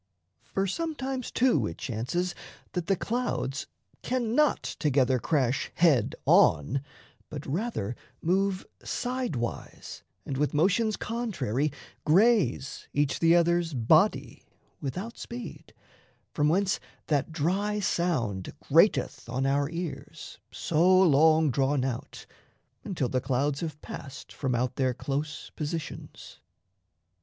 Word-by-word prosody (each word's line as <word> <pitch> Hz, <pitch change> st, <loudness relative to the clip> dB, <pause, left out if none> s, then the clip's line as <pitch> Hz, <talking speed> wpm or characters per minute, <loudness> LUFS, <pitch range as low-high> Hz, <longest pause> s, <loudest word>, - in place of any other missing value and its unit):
For 195 Hz, -, -2 dB
sometimes, 265 Hz, -, -3 dB
too, 230 Hz, -, +2 dB
it 80 Hz, -, -7 dB
chances 135 Hz, +10 st, -2 dB, 0.4 s
that 175 Hz, -2 st, -3 dB
the 195 Hz, -, +3 dB
clouds 220 Hz, -, -2 dB, 0.3 s
Cannot 255 Hz, +4 st, +1 dB
together 130 Hz, -4 st, +1 dB
crash 135 Hz, -2 st, 0 dB
head 150 Hz, -10 st, +3 dB
on, 80 Hz, -, +4 dB, 0.5 s
but 145 Hz, -1 st, -7 dB
rather 145 Hz, -, -2 dB, 0.2 s
Move 190 Hz, +2 st, 0 dB, 0.2 s
side 250 Hz, -, -2 dB
wise 120 Hz, -1 st, -5 dB, 0.2 s
and 135 Hz, -, -3 dB
with 150 Hz, +1 st, 0 dB
motions 200 Hz, +7 st, +2 dB
contrary 155 Hz, -, -1 dB, 0.3 s
Graze 165 Hz, -, +2 dB
each 145 Hz, -1 st, +1 dB
the 165 Hz, 0 st, +5 dB
other's 170 Hz, -2 st, +2 dB
body 115 Hz, -3 st, +2 dB, 0.3 s
without 185 Hz, -, -5 dB
speed, 240 Hz, +1 st, -8 dB, 0.6 s
From 150 Hz, 0 st, +2 dB
whence 190 Hz, +4 st, +2 dB, 0.3 s
that 150 Hz, +1 st, 0 dB
dry 190 Hz, +7 st, 0 dB
sound 130 Hz, -, -1 dB
grateth -, -, +2 dB
on 130 Hz, +2 st, -1 dB
our 140 Hz, +1 st, +1 dB
ears, 170 Hz, -1 st, -6 dB
So 180 Hz, +4 st, +3 dB
long 160 Hz, -2 st, +5 dB
drawn 135 Hz, +1 st, +1 dB
out, 125 Hz, -3 st, -5 dB, 0.6 s
until 160 Hz, -9 st, -2 dB
the 130 Hz, +1 st, -1 dB
clouds 135 Hz, +2 st, 0 dB
have 155 Hz, -3 st, -5 dB
passed 140 Hz, 0 st, -9 dB
From 130 Hz, -3 st, -1 dB
out 125 Hz, +1 st, -1 dB
their 130 Hz, -2 st, +1 dB
close 145 Hz, +4 st, -4 dB
positions. 155 Hz, +1 st, -6 dB
155 Hz, 115 wpm, -28 LUFS, 135-190 Hz, 0.6 s, the